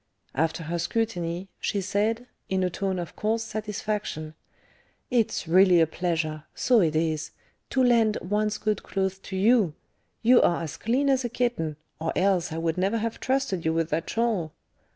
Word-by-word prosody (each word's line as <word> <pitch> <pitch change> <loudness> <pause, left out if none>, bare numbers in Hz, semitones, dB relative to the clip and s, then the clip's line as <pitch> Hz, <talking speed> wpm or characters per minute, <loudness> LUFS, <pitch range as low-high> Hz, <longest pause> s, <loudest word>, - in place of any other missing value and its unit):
After 160 +3 0
her 170 +2 -3
scrutiny, 175 -3 -2
she 205 - -1
said, 210 +5 0 0.2
in 190 0 +1
a 180 - 0
tone 190 0 -2
of 175 -2 -5
coarse 220 +1 0
satisfaction, 210 -7 -4 0.8
"It's 230 -8 +1
really 180 +1 +6
a 165 - +6
pleasure 160 -2 -2
so 245 -4 +4
it 160 -3 +1
is 155 -1 0 0.4
to 260 - +2
lend 230 -3 +4
one's 210 +3 0
good 215 0 -1
clothes 190 0 -2
to 190 - -8
you; 200 -4 +3 0.5
you 245 +2 +7
are 170 -1 +2
as 160 -1 -5
clean 250 +10 0
as 265 -1 +3
a 240 - -2
kitten, 235 -11 -1 0.2
or 160 0 -1
else 185 -3 +2
I 160 - -4
would 165 +1 -1
never 195 +5 +1
have 225 0 -3
trusted 260 -9 0
you 160 - +1
with 165 0 0
that 165 +2 -1
shawl. 215 -9 0
190 Hz, 175 wpm, -26 LUFS, 165-225 Hz, 0.8 s, you